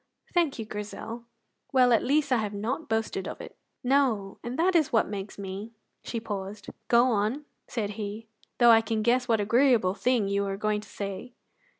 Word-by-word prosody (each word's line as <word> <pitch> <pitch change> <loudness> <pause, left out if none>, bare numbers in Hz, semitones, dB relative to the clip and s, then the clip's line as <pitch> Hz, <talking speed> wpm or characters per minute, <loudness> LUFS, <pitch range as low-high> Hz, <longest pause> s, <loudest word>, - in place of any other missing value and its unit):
"Thank 340 -6 +2
you, 225 - -4
Grizel! 215 +3 -7 0.5
Well, 250 -2 +5
at 225 - +3
least 285 +1 +1
I 250 - +5
have 210 -2 -2
not 235 +10 -3
boasted 220 -4 -1
of - - -6
it." - - -10 0.3
"No, 245 -7 +1
and 240 +2 -4
that 360 +2 +2
is 315 -4 +3
what 225 - +3
makes 200 0 -6
me 200 +3 -6
" - - -50
She 235 - -3
paused. 205 -1 -6 0.2
"Go 240 +1 +5
on," 220 +7 0 0.2
said 210 -4 -3
he, 210 +2 -5 0.3
"though 240 -1 +7
I 225 0 +7
can 220 -1 -2
guess 245 +2 +2
what 225 -3 +3
agreeable 230 -2 +3
thing 235 -1 +1
you 200 0 +1
were 195 -1 -2
going 210 0 0
to 210 - -15
say." 200 +5 -6
225 Hz, 195 wpm, -27 LUFS, 205-250 Hz, 0.5 s, though